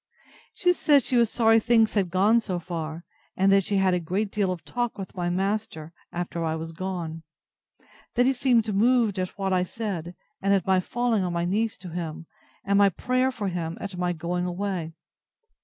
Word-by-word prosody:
She 355 0 +3
said 290 -6 +4
she 255 - -1
was 235 -2 +4
sorry 225 -1 +4
things 225 0 +3
had 195 -4 +1
gone 200 +6 +4
so 195 -5 -3
far; 165 -1 -5 0.3
and 195 +1 +4
that 195 0 +5
she 200 +2 0
had 190 -1 +3
a 180 - +2
great 190 +5 -2
deal 200 -3 0
of 180 -3 -6
talk 240 -2 -2
with 195 -2 -7
my 175 -1 -2
master, 185 -4 -2 0.2
after 175 -1 -3
I 160 -1 -1
was 165 0 -5
gone; 170 -2 -5 0.9
that 245 +1 +4
he 265 - +3
seemed 235 -4 +2
moved 225 -1 +3
at 185 +1 -4
what 195 -1 -1
I 180 - +3
said, 180 -4 -4 0.3
and 200 +1 +3
at 190 - 0
my 190 -1 +3
falling 230 +1 0
on 180 -1 -2
my 170 0 0
knees 210 +5 0
to 180 -1 -9
him, 165 -1 -5 0.4
and 200 0 +3
my 200 -1 +6
prayer 255 +7 0
for 210 -6 -3
him, 170 -2 -4
at 200 -2 -6
my 180 0 0
going 175 +2 -2
away. 180 -3 -3
190 Hz, 200 wpm, -26 LUFS, 175-220 Hz, 0.9 s, my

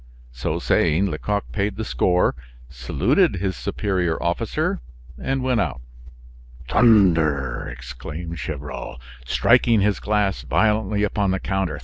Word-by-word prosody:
So - - -3
saying, 85 +4 +2
Lecoq 100 +6 -3
paid 100 0 -1
the 110 - -4
score, 90 -3 +2 0.4
saluted 65 +6 +1
his 95 0 -2
superior 95 -5 -1
officer, 85 0 -1 0.4
and 135 - -2
went 125 -3 +2
out. 65 -9 -2 0.9
"Thunder!" 80 - +3
exclaimed 75 +7 -7
Gevrol, 70 -2 -6 0.3
striking 115 - +4
his 105 -1 +1
glass 105 -2 0
violently 105 +2 +1
upon 100 -1 0
the 95 0 0
counter. 95 -7 -2
95 Hz, 115 wpm, -22 LUFS, 75-105 Hz, 0.9 s, striking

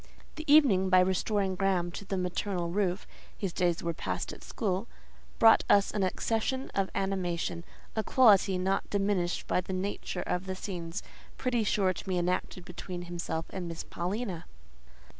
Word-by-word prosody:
The 315 -2 -3
evening, 220 -12 +6
by 185 0 +6
restoring 190 +1 +1
Graham 185 -2 +1
to 190 - -7
the 195 0 -2
maternal 180 -1 -2
roof 190 0 0 0.3
(his 190 -4 -3
days 175 -2 +1
were 170 0 -1
passed - - -3
at - - -12
school), 200 0 -2 0.5
brought 225 0 +7
us 200 -1 +5
an 210 - -1
accession 225 +7 -1
of 195 -1 0
animation—a 180 +1 -3
quality 205 -7 +5
not 190 +2 0
diminished 195 -3 0
by - - +1
the 190 - -6
nature 185 -1 -3
of 180 +2 -2
the 190 - -2
scenes 175 -2 -5 0.3
pretty 245 -3 0
sure 195 -2 +2
to - - -8
be 185 -2 -1
enacted 180 0 -1
between 180 0 -6
him 175 0 -7 0.3
and 180 -2 -4
Miss 165 -1 -5
Paulina. 185 0 -3
190 Hz, 160 wpm, -30 LUFS, 180-205 Hz, 0.5 s, brought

